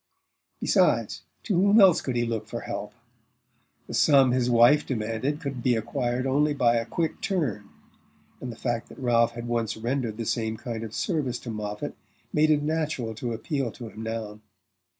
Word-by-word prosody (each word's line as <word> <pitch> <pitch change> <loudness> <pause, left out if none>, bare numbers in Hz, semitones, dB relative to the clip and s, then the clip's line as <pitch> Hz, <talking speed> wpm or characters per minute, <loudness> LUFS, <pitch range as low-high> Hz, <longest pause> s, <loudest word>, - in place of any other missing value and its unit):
Besides, - - +2 0.2
to 215 - -1
whom 200 +3 +5
else 190 -5 +6
could 130 - -3
he 120 0 +1
look 110 -2 -3
for - - -5
help? - - -6 0.9
The - - -9
sum 135 -4 +5
his 125 -1 +1
wife 120 +5 +6
demanded 115 +4 -2
could 140 -6 -5
be 125 0 +2
acquired 120 +2 -2
only 145 +2 +2
by 120 -4 +3
"a 115 - -2
quick 165 -2 -2
turn," 135 - -2 0.7
and 125 - -5
the - - -9
fact 120 -1 -3
that - - -13
Ralph 120 -2 +2
had 120 0 -6
once 115 -3 -1
rendered 115 -1 -2
the 115 - -4
same 110 0 -1
kind 115 -2 -5
of 110 -1 -7
service 145 -9 -1
to 120 - -6
Moffatt 105 -1 -5 0.4
made 155 +1 +3
it 150 -1 +3
natural 150 -7 -1
to 115 +2 -4
appeal 135 +1 -2
to 120 -3 -8
him 110 - -10
now. 110 -2 -5
120 Hz, 180 wpm, -26 LUFS, 115-140 Hz, 0.9 s, else